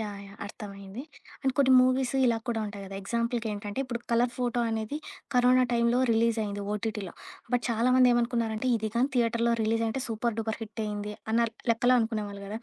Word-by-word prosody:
Yeah! 205 -2 -5
Yeah! 200 - -13
అర్థమైంది. 200 +2 -8 0.4
And 270 -2 +1
కొన్ని 265 -2 +5
movies 255 0 +2
ఇలా 235 -2 +3
కూడా 230 -2 0
ఉంటాయి 205 -1 -7
గదా! 195 0 -8
ఎగ్జాంపుల్‌కి 235 +2 -1
ఏంటంటే, 205 +1 -5
ఇప్పుడు 240 -2 -4
'కలర్ 240 +1 +2
ఫోటో' 245 -1 0
అనేది 220 +5 -2 0.4
కరోనా 250 +1 +5
టైంలో 235 +1 +3
రిలీజ్ 230 0 +2
అయింది 205 -1 -4
ఓటీటీలో. 210 -3 -3 0.4
బట్ 245 -1 +2
చాలామంది 250 +2 +4
ఏమనుకున్నారంటే, 235 0 0
ఇది 220 -1 -2
గాని 245 +3 +2
థియేటరులో 235 -1 +2
రిలీజ్ 225 +1 +1
‌అయింటే, 225 +4 -2
సూపర్ 230 +1 -1
డూపర్ 220 0 -2
హిట్ 220 +1 -5
అయింది 210 0 -4 0.2
అన్నరు 230 0 +2 0.2
లెక్కలో 245 +2 +4
అనుకునేవాళ్ళు 215 -3 -2
గదా, 210 +2 -5
230 Hz, 175 wpm, -28 LUFS, 210-245 Hz, 0.4 s, కొన్ని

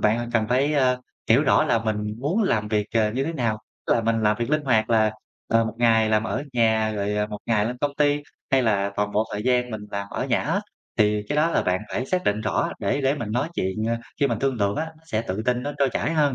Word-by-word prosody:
bạn 115 +3 +1
cần 110 -2 +1
phải, 135 +5 +2
a, 130 -3 +3 0.3
hiểu - - +6
rõ - - +4
là 115 - +2
mình 110 -1 -1 0.2
muốn 170 - +1
làm 110 - +1
việc, 105 -1 0
ờ, 110 -2 +3
như 130 +3 -1
thế 165 - -2
nào, 120 -8 -1 0.3
tức - - +3
là - - +2
mình 115 0 0
làm 105 0 +3
việc 120 +3 -2
linh 150 0 +2
hoạt 115 -4 +2
là, 110 -2 +4 0.4
ờ, 115 0 +3
1 110 -1 -4
ngày 115 -2 +4
làm 110 0 +2
ở 120 - -2
nhà 110 -2 +2
rồi 105 0 -1
1 105 -1 -6
ngày 110 -3 +2
lên 120 +3 -3
công 145 -1 0
ty, 145 0 +2 0.3
hay 135 -1 +4
là 100 -4 +1
toàn 105 0 -1
bộ 105 +1 +2
thời 105 - -3
gian 125 0 +1
mình 110 -2 -5
làm 100 -1 -3
ở - - -2
nhà - - +1
hết, - - 0 0.4
thì 105 0 +3
cái 150 - -1
đó 155 +3 +3
là - - +1
bạn 90 0 0
phải 130 - -2
xác 180 +3 -1
định 105 +1 +1
rõ 110 - 0
để 105 +8 0
để 135 0 +2
mình 120 -7 -5
nói 125 +7 0
chuyện, 95 - -2
ờ, 115 - +1 0.3
khi 140 - +4
mình 115 -5 -1
thương 135 +2 0
lượng 100 -2 0
á, 160 +1 -2 0.2
sẽ 110 -7 -1
tự 100 -1 -3
tin, 125 0 +1
nó 145 - -3
trôi 140 - +3
chảy 160 - -1
hơn. 150 -4 +2
115 Hz, 270 wpm, -24 LUFS, 105-135 Hz, 0.4 s, hiểu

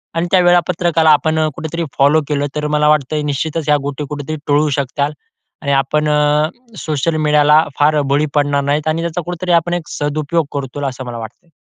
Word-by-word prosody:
आणि 165 +1 0
त्या 185 - +5
वेळापत्रकाला 175 -2 +2
आपण 155 +1 +2
अ, 155 - +2
कुठेतरी 165 +1 -4
फॉलो 145 +3 +4
केलं 145 -1 0
तर 150 0 -2
मला 150 0 +2
वाटतंय 150 0 +1
निश्चितच 160 +3 -2
ह्या 150 - +5
गोष्टी 145 +1 -4
कुठेतरी 150 +1 -5
टळू 150 +1 +2
शकतील. 140 +2 -2 0.5
आणि 140 - -1
आपण 150 +3 +1
अ, 150 0 +2 0.3
सोशल 155 0 -1
मीडियाला 150 0 +4 0.2
फार 150 +1 +3
बळी 145 +2 +2
पडणार 145 -1 +2
नाहीत, 145 +2 -1
आणि 155 +1 0
त्याचा 170 +1 -3
कुठेतरी 180 +1 -3
आपण 175 +1 -4
एक 170 -3 -5
सदुपयोग 150 +2 -1
करूत, 140 0 -5
असं 130 -1 -5
मला 120 -1 -6
वाटतंय. 120 - -10
150 Hz, 185 wpm, -16 LUFS, 145-160 Hz, 0.5 s, त्या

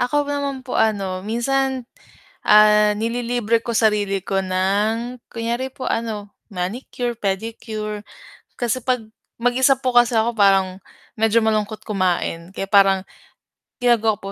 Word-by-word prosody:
Ako 290 +4 +1
naman 280 -2 -3
po, - - -5
ano, 195 -4 0
minsan, 260 +4 -1 0.6
ah, 210 0 +6
nililibre 230 +1 0
ko 235 - -3
sarili 205 -3 +1
ko 195 +1 -1
ng 205 +6 0
kunyari 235 +3 -2
po 260 - -6
ano, 215 -3 -3 0.2
manicure, 235 +5 -4
pedicure, 215 +1 -4 0.5
kasi 240 +1 0
'pag 250 -1 0 0.4
mag-isa 250 +3 +4
po 255 -2 0
kasi 240 0 +5
ako 225 +2 +3
parang 195 -2 +3 0.4
medyo 225 +1 +3
malungkot 215 0 -1
kumain, 185 -3 -1
kaya 195 - -3
parang 195 -1 +5 0.8
ginagawa 225 -3 +3
ko 195 0 -7
220 Hz, 125 wpm, -21 LUFS, 200-240 Hz, 0.8 s, ah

